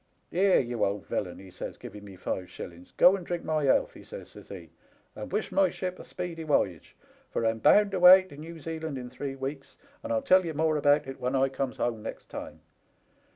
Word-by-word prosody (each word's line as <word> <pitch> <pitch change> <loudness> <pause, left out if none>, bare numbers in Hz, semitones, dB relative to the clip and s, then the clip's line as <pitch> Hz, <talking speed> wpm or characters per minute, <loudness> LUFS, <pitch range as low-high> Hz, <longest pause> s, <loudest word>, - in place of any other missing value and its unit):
Here, 190 +2 +4
you 120 -2 -1
old 100 0 -1
villain,' 90 -3 -3
he 95 -1 -12
says, - - -7
giving 105 0 -10
me 100 -2 -11
five 90 0 -4
shillings, 85 0 -10
' - - -41
go 180 +2 +7
and 190 - -6
drink 175 0 -4
my 155 -2 0
health,' 320 - +3
he - - -13
says, - - -9
says - - -14
he, - - -9 0.2
* - - -37
and - - -7
wish - - -2
my 290 -1 +4
ship 185 -1 -5
a - - -8
speedy 175 -3 -6
woyage, 100 - 0 0.3
for 115 - -2
I'm 115 0 +1
bound 205 - +5
away 185 0 +9
to 185 -6 -14
New 160 +3 -9
Zealand 160 -2 -5
in 125 -1 -7
three 135 +1 -5
weeks, 135 +1 -6 0.2
and 290 - -5
I'll 280 -1 +1
tell 185 -8 +5
ye 165 -2 -4
more 155 +1 +1
about 145 0 +3
it 135 0 -8
when 125 +2 -1
I 135 0 +3
comes 135 -1 -3
home 115 -3 -1
next - - -8
time. - - -8
145 Hz, 230 wpm, -28 LUFS, 120-180 Hz, 0.3 s, away